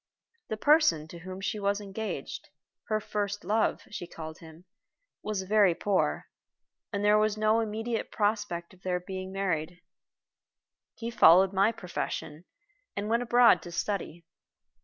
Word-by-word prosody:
The 220 - -3
person 215 - +4
to 170 - -9
whom 185 +2 -8
she 210 +2 -2
was 200 0 0
engaged 210 +2 -6 0.4
her 215 -1 0
first 205 -1 -3
love, 215 +3 +1
she 175 -4 -6
called 160 -1 -8
him 165 0 -14 0.6
was 210 -3 -3
very 200 -2 +4
poor, 175 - 0 0.7
and 200 0 -2
there 210 +1 +5
was 215 0 +1
no 215 +1 +3
immediate 225 +1 -2
prospect 205 -5 -1
of 185 - -20
their 180 -1 -1
being 185 +1 -6
married. 180 -3 -2 1.2
He 230 0 -5
followed 190 -2 +6
my 195 +3 +4
profession, 175 -5 -5 0.5
and 205 +1 -3
went 230 +1 +2
abroad 245 0 +5
to 175 - -9
study. 170 -2 -3
200 Hz, 140 wpm, -29 LUFS, 175-215 Hz, 1.2 s, followed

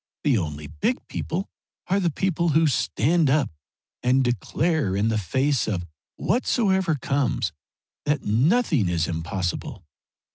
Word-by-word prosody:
The 145 -4 +3
only 75 -3 -4
big 75 +1 -2
people 180 +5 -3 0.4
are 195 +2 +1
the 175 -3 +2
people 170 +1 0
who 160 +2 +4
stand 150 +3 +2
up 135 - +2 0.5
and 130 +2 +3
declare 125 - 0
in 105 +3 +1
the 110 -1 +1
face 130 - +1
of 90 -5 -2 0.3
whatsoever 190 - +1
comes 140 -1 0 0.5
that 145 -1 0
nothing 140 - +2
is 85 -2 0
impossible. 85 +2 -3
135 Hz, 130 wpm, -24 LUFS, 100-165 Hz, 0.5 s, who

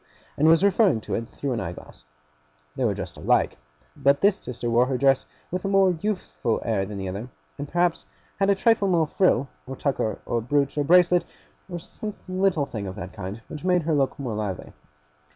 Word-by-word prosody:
and 155 - +3
was 165 +3 +5
referring 200 - +4
to - - -6
it 115 +1 -2
through 140 - -4
an 120 - -1
eye 85 - -3
glass. 75 - -14 0.7
They - - -2
were - - +1
dressed - - -7
alike, - - +1 0.4
but 140 0 +3
this 200 0 +4
sister 120 -1 -5
wore 120 +2 +3
her 130 -1 0
dress 135 0 +3 0.2
with 180 +1 -3
a - - -1
more 195 -1 +4
youthful 180 - -2
air 100 -4 0
than 105 0 -6
the 95 -1 -4
other; 100 +7 -5 0.3
and 145 - -4
perhaps 175 +1 0 0.3
had 195 0 +3
a 200 - +5
trifle 210 0 +3
more 170 -4 +3
frill, 150 -5 +2 0.2
or 135 - -5
tucker, 130 -6 -1
or 115 - -1
brooch, 140 +4 0
or 145 - +1
bracelet, 175 +2 +5 0.5
or 175 - -4
some 210 +4 -7
little 185 -5 +1
thing 105 -6 -5
of 95 - -6
that 95 -3 -7
kind, 100 +2 -7
which 155 -1 -8
made 180 -2 +2
her 160 +1 0
look 140 -2 +1
more 130 -5 -4
lively. 105 -4 -4
140 Hz, 205 wpm, -25 LUFS, 115-180 Hz, 0.7 s, was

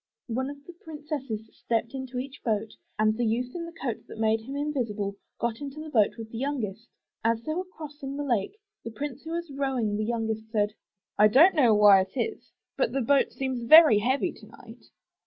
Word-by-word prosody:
One 260 +4 -1
of 285 0 -10
the 350 - -11
princesses 295 -9 -6
stepped 230 +1 -2
into 260 -1 -6
each 265 +2 -6
boat 220 -2 -1 0.3
and 215 0 +3
the 240 - -1
youth 240 +2 -1
in 340 -1 -4
the - - -8
coat 255 -9 -4
that - - -10
made 220 0 +2
him 265 +5 -7
invisible, 230 -9 -2 0.2
got 235 +1 -2
into 285 +1 -6
the 310 0 -7
boat 220 -4 +3
with 225 -1 -8
the 225 - -5
youngest. 235 -6 -3 0.4
As 230 0 +1
they 310 - -2
were 365 +3 -3
crossing 295 -5 -8
the 290 - -2
lake 240 - -1 0.3
the - - -5
prince 275 +4 -6
who 320 - -8
was 340 -2 -4
rowing 260 -7 -1
the 215 - -1
youngest 220 -1 -2
said, 210 -2 0 0.5
*'I 210 - +8
do 245 +6 +4
not 370 +3 +7
know 245 -9 +4
why 205 -2 +7
it 190 +7 -5
is, 445 - -3 0.2
but - - 0
the 270 - 0
boat 275 +3 +3
seems 260 -2 -3
very 270 -2 +8
heavy 260 +6 +1
tonight. - - -15
250 Hz, 210 wpm, -27 LUFS, 220-285 Hz, 0.5 s, I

